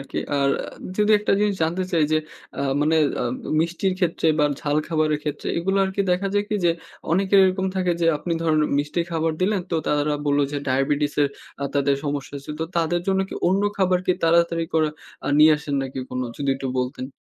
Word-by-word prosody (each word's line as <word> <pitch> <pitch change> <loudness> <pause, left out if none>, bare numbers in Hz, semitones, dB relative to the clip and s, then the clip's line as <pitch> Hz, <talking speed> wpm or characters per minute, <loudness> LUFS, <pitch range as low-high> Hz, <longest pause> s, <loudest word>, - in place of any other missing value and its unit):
আরকি। 135 - -6 0.2
আর 140 0 +3
আ - - -7 0.3
যদি 210 +1 +4
একটা 210 - 0
জিনিস 210 -1 +2
জানতে 170 +4 0
চাই 160 -3 +3
যে, 155 - +4 0.4
আ - - -1 0.2
মানে 160 +2 +2 0.3
আব 125 0 -1 0.3
মিষ্টির 175 +3 0
ক্ষেত্রে 170 -2 0
বা 150 - +4 0.2
ঝাল 145 0 0
খাবারের 155 -2 +1
ক্ষেত্রে 150 -1 -3
এগুলো 195 +3 0
আরকি 190 +1 -1
দেখা 195 +2 0
যায় 205 - +2
কি 210 - +1
যে, - - +5 0.4
অনেকের 195 +2 +3
এরকম 190 0 +1
থাকে 180 -2 +1
যে - - +3
আপনি 170 +2 -3
ধরেন 155 -2 +2 0.2
মিষ্টি 150 +4 -1
খাবার 165 0 0
দিলেন, 200 0 +1
তো 165 - +1
তারা 150 0 +1
বললো 145 0 +3
যে 145 - -1
ডায়াবেটিসের 145 +2 +1 0.3
আ - - 0
তাদের 140 -1 +2
সমস্যা 145 -1 -3
আছে। 140 - -10
তো - - +1
তাদের 170 +1 +1
জন্য 190 0 +2
কি - - -7
অন্য 195 +2 +2 0.2
খাবার 185 -2 +3
কি 180 - +4
তাড়াতাড়ি 170 0 +3
করা 155 -1 +3 0.4
আ - - 0
নিয়ে 155 +1 +8
আসেন 145 -1 -4
নাকি 135 0 -6
কোনো? 125 0 -2
যদি 140 -1 -2
একটু 135 -1 -4
বলতেন। 130 +1 -4
160 Hz, 205 wpm, -23 LUFS, 145-185 Hz, 0.4 s, নিয়ে